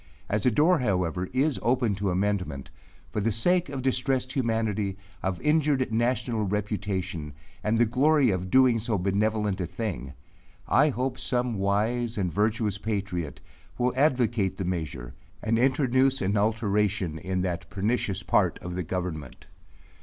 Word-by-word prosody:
As 105 +3 +1
a - - +7
door, 160 +9 +3
however, 90 -6 -1
is 135 +3 +1
open 120 -3 +2
to 100 0 -1
amendment, 90 -6 -1 0.4
for 105 - -1
the 115 +3 +1
sake 175 - +2
of 135 -2 -4
distressed 130 0 0
humanity, 110 -5 -1 0.2
of 95 -1 -2
injured 150 -4 +2
national 120 0 0
reputation, 95 -6 -3 0.3
and 110 +2 +1
the 120 - +5
glory 135 +2 +3
of 95 0 -2
doing 130 0 +5
so 110 -1 0
benevolent 100 +1 0
a 90 - -2
thing, 80 - -4 0.5
I 150 +3 +4
hope 130 0 -2
some 125 -1 0
wise 110 +4 0
and 90 -5 -1
virtuous 105 -1 0
patriot 100 -8 -3 0.4
will 125 0 +1
advocate 120 -9 +2
the 95 - -3
measure, 80 -9 -4 0.3
and 115 +1 +1
introduce 130 0 +3
an 95 +2 0
alteration 105 -5 0
in 95 +1 -2
that 85 -2 -3
pernicious 100 -1 -1
part 85 - +2
of 90 - -7
the 90 - -2
government. 80 -6 -5
105 Hz, 145 wpm, -27 LUFS, 95-125 Hz, 0.5 s, a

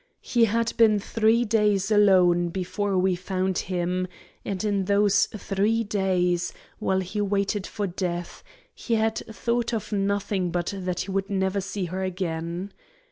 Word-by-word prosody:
He 235 -2 +3
had 230 +1 0
been 220 -2 +5
three 225 +3 +2
days 210 -2 +2
alone 180 -4 +5
before 190 +2 -2
we 185 0 +3
found 185 +1 -1
him, 180 0 -1 0.4
and 195 0 -3
in 200 -2 0
those 205 0 +3
three 215 +2 0
days, 185 -4 0 0.3
while 190 0 +1
he 190 +3 -3
waited 200 0 0
for 210 -2 -3
death, 175 -2 -4 0.3
he 230 - -2
had 220 0 +1
thought 235 +2 -1
of 220 - -5
nothing 200 -2 0
but 175 +2 -2
that 185 -2 -3
he 195 - -5
would 195 0 -1
never 190 0 0
see 195 0 -3
her 185 +2 -4
again. 175 0 -3
195 Hz, 150 wpm, -25 LUFS, 185-210 Hz, 0.4 s, been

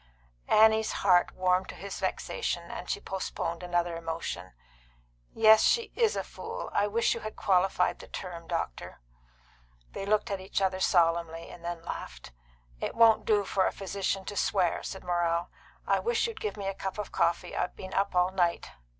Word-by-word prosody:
Annie's 220 0 +5
heart 180 -2 +5
warmed 185 0 +1
to - - -7
his 200 0 -7
vexation, - - -2
and - - -7
she 415 - -1
postponed 180 - -4
another 175 -1 -1
emotion. 165 - -5 0.8
"Yes, 220 -1 +7
she 465 -1 +2
is 460 -2 +2
a - - -1
fool. - - -7
I 205 - +2
wish 230 +3 +2
you - - -5
had 215 - -7
qualified 190 0 +2
the - - -11
term, 170 -3 -7
doctor." 165 - -4 0.9
They 195 - -6
looked 210 0 +1
at 195 -1 -2
each 190 +2 -2
other 190 -1 0
solemnly, 170 -2 +1
and 170 - -12
then 170 -1 -5
laughed. 60 - -7 0.5
"It - - -3
won't 225 -1 +5
do 210 -2 +3
for 190 0 +1
a - - 0
physician 195 0 -3
to 205 - -5
swear," 185 -4 +1
said 190 - -7
Morrell. 175 -1 0 0.3
"I - - +2
wish 470 -1 +1
you'd 455 -2 -5
give 430 - -3
me 200 -1 -4
a 195 - -1
cup 190 +1 -5
of 210 - -5
coffee. 170 - 0
I've - - -2
been 185 0 -8
up 195 -1 0
all 180 +1 +3
night." 175 -3 0
190 Hz, 180 wpm, -29 LUFS, 170-205 Hz, 0.9 s, Yes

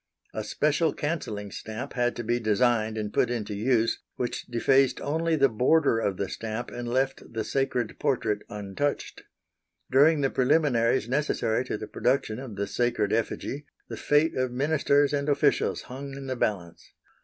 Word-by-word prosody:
A - - -3
special 150 +2 +1
cancelling 110 -10 -3
stamp 110 +5 -6
had 120 -1 0
to 120 - -4
be 120 +2 0
designed 110 0 +1
and 105 -1 -4
put 125 - +2
into 110 -4 -3
use 115 +2 +1 0.2
which 125 - -3
defaced 130 +3 +3
only 160 +3 0
the 140 -3 +5
border 125 +2 +3
of 100 -4 -1
the 100 - -2
stamp 115 +4 -5
and 120 0 -5
left 130 +2 0
the 115 -1 -2
sacred 125 -4 -1
portrait 115 -7 0
untouched. 105 +8 -3 0.7
During 145 +3 +5
the 135 - +1
preliminaries 130 -4 +2
necessary 125 -3 0
to 115 - -3
the 110 - -6
production 125 -1 0
of 130 -6 -8
the 100 0 -2
sacred 110 -1 0
effigy 135 +5 -2 0.2
the - - -5
fate 150 +2 +2
of 130 -1 0
ministers 145 +1 +2
and 140 0 0
officials 145 - +2
hung 135 +2 -8
in 140 0 -7
the 130 -1 -3
balance. 95 -8 -3
125 Hz, 165 wpm, -27 LUFS, 110-140 Hz, 0.7 s, the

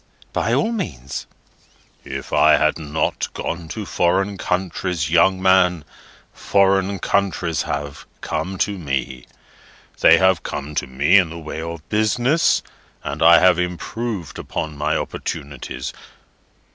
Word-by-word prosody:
"By - - 0
all 225 - +1
means." 70 - -5 0.8
"If - - -7
I 75 0 +5
have 75 +1 +1
not 75 0 -2
gone 85 -1 -4
to 105 +5 -5
foreign 95 +3 +1
countries, 90 -4 -2
young 95 +2 +4
man, 95 -4 +3 0.5
foreign 100 0 +2
countries 95 -3 0
have 70 0 -5
come 90 +5 -3
to 100 -2 -6
me. 70 -4 -4 0.7
They - - +7
have 95 -1 +3
come 75 0 -5
to - - -2
me 70 +9 +4
in 90 -3 0
the 85 - -8
way 80 -1 -6
of 85 -1 -7
business, 120 +8 +2 0.4
and 70 +3 -5
I 85 +1 +8
have 90 -1 +5
improved 90 +2 -4
upon 80 -1 -4
my 75 +2 0
opportunities. 70 0 -5
85 Hz, 130 wpm, -21 LUFS, 75-95 Hz, 0.8 s, I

